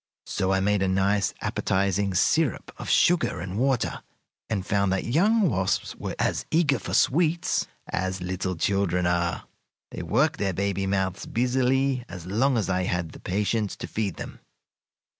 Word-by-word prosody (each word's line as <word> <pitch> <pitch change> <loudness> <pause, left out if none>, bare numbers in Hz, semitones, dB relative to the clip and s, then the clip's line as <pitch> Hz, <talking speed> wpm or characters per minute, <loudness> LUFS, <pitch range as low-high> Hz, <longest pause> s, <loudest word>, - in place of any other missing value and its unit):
So 95 0 -1
I 95 0 +2
made 105 0 +2
a 95 - +2
nice, 95 +1 +2
appetizing 100 0 0
syrup 145 - +1
of - - -6
sugar 175 - +3
and 90 +4 -4
water, 130 -2 0 0.5
and 100 -4 -2
found 100 -1 +1
that 95 - 0
young 200 - +3
wasps 95 - 0
were - - -5
as - - 0
eager 150 -6 +2
for - - -3
sweets 165 +3 +2 0.2
as 95 0 -2
little 90 +1 -3
children 90 0 +1
are. 85 -1 0 0.5
They - - -5
worked 135 - +1
their 95 -2 0
baby 95 +1 -1
mouths 95 -1 -1
busily 130 +2 +1
as 90 -3 -8
long 120 +8 +1
as 110 - 0
I 95 -1 0
had 90 -3 -2
the - - -12
patience 105 +2 -1
to - - -6
feed 105 -6 -2
them. - - -8
100 Hz, 160 wpm, -26 LUFS, 95-125 Hz, 0.5 s, sugar